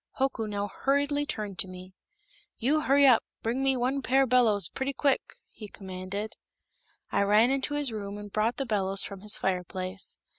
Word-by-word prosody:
Hoku 265 Hz, -4 st, 0 dB
now 205 Hz, -1 st, -2 dB
hurriedly 285 Hz, +5 st, 0 dB
turned 205 Hz, -6 st, -4 dB
to -, -, +1 dB
me. 185 Hz, 0 st, -11 dB, 0.6 s
"You 290 Hz, +6 st, +1 dB
hully 280 Hz, 0 st, +4 dB
up, 250 Hz, -4 st, +6 dB, 0.2 s
bling 235 Hz, +4 st, -1 dB
me 270 Hz, -1 st, +2 dB
one 260 Hz, +3 st, 0 dB
pair 270 Hz, +1 st, +3 dB
bellows 230 Hz, -7 st, +3 dB
pletty 270 Hz, +1 st, -3 dB
quick!" 280 Hz, -3 st, +2 dB, 0.3 s
he 215 Hz, -, -10 dB
commanded. 195 Hz, +2 st, -6 dB, 0.7 s
I -, -, +2 dB
ran 210 Hz, +5 st, +4 dB
into 275 Hz, +2 st, 0 dB
his 290 Hz, -4 st, +1 dB
room 205 Hz, -2 st, -5 dB
and 205 Hz, -1 st, -9 dB
brought 220 Hz, +3 st, +1 dB
the 275 Hz, -, -2 dB
bellows 195 Hz, -4 st, 0 dB
from 195 Hz, -2 st, -7 dB
his 210 Hz, +1 st, 0 dB
fireplace. 185 Hz, +1 st, -2 dB
220 Hz, 175 wpm, -28 LUFS, 200-270 Hz, 0.7 s, up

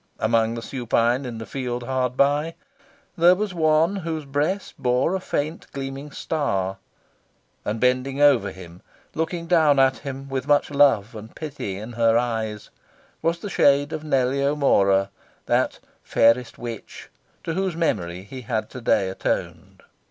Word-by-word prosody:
Among 115 Hz, 0 st, +1 dB
the 115 Hz, -, -6 dB
supine 120 Hz, 0 st, 0 dB
in 120 Hz, -2 st, -6 dB
the 110 Hz, -, -6 dB
field 125 Hz, -2 st, -4 dB
hard 130 Hz, 0 st, -1 dB
by, 145 Hz, +4 st, +2 dB, 0.6 s
there 175 Hz, +1 st, +6 dB
was 205 Hz, 0 st, -3 dB
one 160 Hz, +3 st, +2 dB
whose 160 Hz, -4 st, -4 dB
breast 150 Hz, +8 st, -1 dB
bore 125 Hz, +7 st, +1 dB
a 190 Hz, -, 0 dB
faint 155 Hz, -2 st, -3 dB
gleaming 135 Hz, +1 st, -5 dB
star. 100 Hz, -, -2 dB, 0.9 s
And 105 Hz, +2 st, -3 dB
bending 130 Hz, +2 st, +1 dB
over 145 Hz, -4 st, +5 dB
him, 90 Hz, -1 st, -12 dB, 0.3 s
looking 165 Hz, +1 st, -2 dB
down 160 Hz, -4 st, +4 dB
at 135 Hz, -1 st, +4 dB
him 135 Hz, 0 st, -7 dB
with 135 Hz, -1 st, -3 dB
much 145 Hz, 0 st, +3 dB
love 135 Hz, -6 st, +3 dB
and 110 Hz, 0 st, -10 dB
pity 140 Hz, -11 st, -5 dB
in 110 Hz, +4 st, -7 dB
her 115 Hz, -1 st, +3 dB
eyes, 110 Hz, -3 st, -2 dB, 0.5 s
was 165 Hz, +1 st, +1 dB
the 200 Hz, +4 st, -7 dB
shade 145 Hz, 0 st, +3 dB
of 155 Hz, -, -4 dB
Nellie 135 Hz, -2 st, +1 dB
O'Mora, 100 Hz, -9 st, +3 dB, 0.3 s
that -, -, +1 dB, 0.2 s
"fairest 115 Hz, +2 st, +2 dB
witch," 115 Hz, -3 st, -8 dB, 0.3 s
to 165 Hz, -, -3 dB
whose 190 Hz, -1 st, -1 dB
memory 90 Hz, -, -1 dB
he 130 Hz, +6 st, -9 dB
had 115 Hz, -2 st, -3 dB
to 125 Hz, -, -8 dB
day 110 Hz, -4 st, +2 dB
atoned. 95 Hz, -, -4 dB
135 Hz, 150 wpm, -23 LUFS, 115-150 Hz, 0.9 s, there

